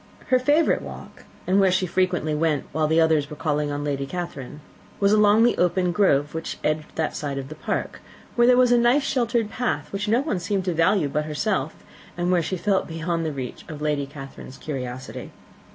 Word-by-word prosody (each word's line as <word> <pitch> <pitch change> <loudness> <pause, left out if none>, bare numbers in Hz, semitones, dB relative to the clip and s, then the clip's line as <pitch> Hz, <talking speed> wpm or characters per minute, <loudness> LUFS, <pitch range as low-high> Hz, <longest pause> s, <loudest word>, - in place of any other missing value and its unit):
Her 255 -1 +4
favourite 295 +5 +3
walk, - - -10 0.2
and 190 +2 +3
where 190 -2 +4
she 185 0 +1
frequently 180 -3 0
went 150 -2 0
while 155 -1 +1
the 160 +2 +3
others 160 -3 +3
were 150 - -7
calling 150 -1 -1
on 145 0 -3
Lady 140 -2 -2
Catherine, 150 -4 -6 0.4
was 200 0 +3
along 210 +1 +5
the 240 - +4
open 180 0 +2
grove 150 -6 +2
which 160 0 -4
edged 155 0 -2
that 160 - -1
side 140 -2 -3
of 135 0 -5
the - - -6
park, 155 - -3 0.4
where 240 0 +4
there 250 0 +6
was 250 -1 +5
a 240 - +5
nice 245 +4 +3
sheltered 235 -5 0
path, 245 -4 -2
which 205 +2 -2
no 230 +4 +3
one 280 - -2
seemed 195 +1 -2
to 180 - 0
value 165 0 +3
but 150 +2 -1
herself, 155 0 -1 0.4
and 175 +1 0
where 180 -2 +3
she 185 +3 -3
felt 195 +1 0
beyond 165 +1 -2
the - - -2
reach 130 -3 -6
of 155 -2 -7
Lady 150 -2 -1
Catherine's 135 -2 -10
curiosity. 130 -4 -6
165 Hz, 205 wpm, -24 LUFS, 150-205 Hz, 0.4 s, there